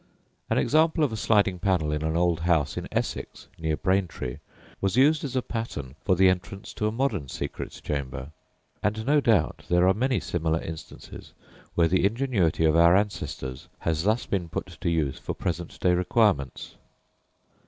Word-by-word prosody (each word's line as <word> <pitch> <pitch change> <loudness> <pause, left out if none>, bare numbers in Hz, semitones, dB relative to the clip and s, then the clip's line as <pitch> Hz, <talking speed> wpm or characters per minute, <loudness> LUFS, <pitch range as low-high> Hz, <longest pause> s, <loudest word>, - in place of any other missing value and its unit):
An - - +1
example 160 +1 +3
of 135 -6 +1
a - - -1
sliding 100 -4 +2
panel 90 -5 +1
in 75 0 -1
an 80 +1 0
old 85 -1 +2
house 80 -4 +1
in - - -4
Essex - - -3
(near 80 -1 -1
Braintree) 95 -9 -1 0.4
was 95 +3 0
used 150 +3 +4
as 135 -3 -4
a 130 - +1
pattern 75 - -5
for 95 - +3
the 95 +1 +5
entrance 95 +3 -2
to 105 - -1
a - - 0
modern 110 - -1
secret - - -6
chamber; 70 0 -4 0.5
and 110 +2 -1
no 145 +2 +4
doubt 110 - +2
there 90 +1 +4
are 95 - +5
many 125 +2 +1
similar 80 -2 -1
instances 80 -1 -9 0.4
where 85 -1 +4
the 90 +1 +2
ingenuity 100 - +1
of 80 0 +3
our 85 +1 +6
ancestors 95 -10 -2
has 80 -2 0
thus 110 +6 +1
been 90 -4 -2
put - - -3 0.2
to - - 0
use 80 -5 0
for - - -5
present 85 0 -4
day 90 - +3
requirements. 90 - +1
90 Hz, 175 wpm, -26 LUFS, 80-110 Hz, 0.5 s, our